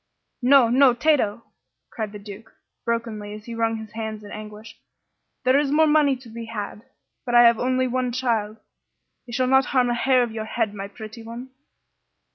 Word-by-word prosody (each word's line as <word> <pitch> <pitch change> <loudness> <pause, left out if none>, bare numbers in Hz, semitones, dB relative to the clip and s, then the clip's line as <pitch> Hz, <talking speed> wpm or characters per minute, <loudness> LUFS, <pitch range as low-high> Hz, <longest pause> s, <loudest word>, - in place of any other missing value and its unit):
"No, 255 0 +6
no, 255 0 +5
Tato!" 245 -6 +1 0.5
cried 220 -3 -4
the 210 - -8
Duke, 205 +2 -12 0.3
brokenly, 230 -3 -3
as 210 0 -12
he 235 - -7
wrung 225 0 0
his 220 -1 -9
hands 220 -1 -5
in 205 - -11
anguish. 215 0 -9 0.7
"There 260 +2 +4
is 290 -1 0
more 315 +2 +4
money 295 -3 +3
to 255 -1 -14
be 230 +1 -7
had, 210 -2 -6 0.4
but 240 -2 -2
I 240 - +8
have 235 -1 +5
only 255 +1 +1
one 250 0 -1
child. 230 -4 -1 0.7
They - - -9
shall 255 +2 +1
not 265 +1 +4
harm 250 -3 +1
a - - +1
hair 255 +1 +3
of 235 - -4
your 220 -1 -5
head, 220 -1 -2
my 200 -1 -6
pretty 220 +2 -10
one!" 235 +3 -9
235 Hz, 190 wpm, -23 LUFS, 215-255 Hz, 0.7 s, I